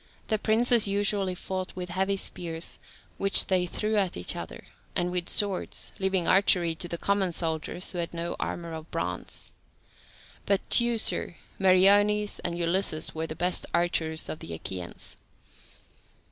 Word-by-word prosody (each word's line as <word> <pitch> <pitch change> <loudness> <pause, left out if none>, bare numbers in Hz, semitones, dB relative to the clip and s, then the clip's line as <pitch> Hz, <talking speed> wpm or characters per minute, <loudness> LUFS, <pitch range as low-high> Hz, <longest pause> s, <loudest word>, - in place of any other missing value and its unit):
The 215 -2 +1
princes 230 +1 +4
usually 200 -2 +1
fought 185 +1 -5
with 180 -1 -5
heavy 190 +2 0
spears, 165 -3 -4 0.4
which 195 0 +5
they 180 -2 +1
threw 215 +4 -1
at 195 -3 0
each 90 - -2
other, - - -8 0.3
and 175 0 0
with 180 -1 -1
swords, 200 -3 +1
leaving 190 -2 0
archery 180 -3 +4
to 160 +2 -5
the 170 - -4
common 195 0 +1
soldiers 165 +2 -2
who 180 - -4
had 170 - -3
no 170 0 -4
armour 170 -1 -4
of 160 0 -8
bronze. 90 +1 -4 1.0
But 200 -1 +1
Teucer, 235 -6 +3 0.2
Meriones, 205 +2 +4
and 170 0 -3
Ulysses 170 -2 +1
were 160 0 -3
the 155 - -6
best 180 +2 0
archers 160 -2 0
of 155 - -5
the 85 - -6
Achaeans. 90 +1 -5
180 Hz, 145 wpm, -27 LUFS, 170-200 Hz, 1.0 s, which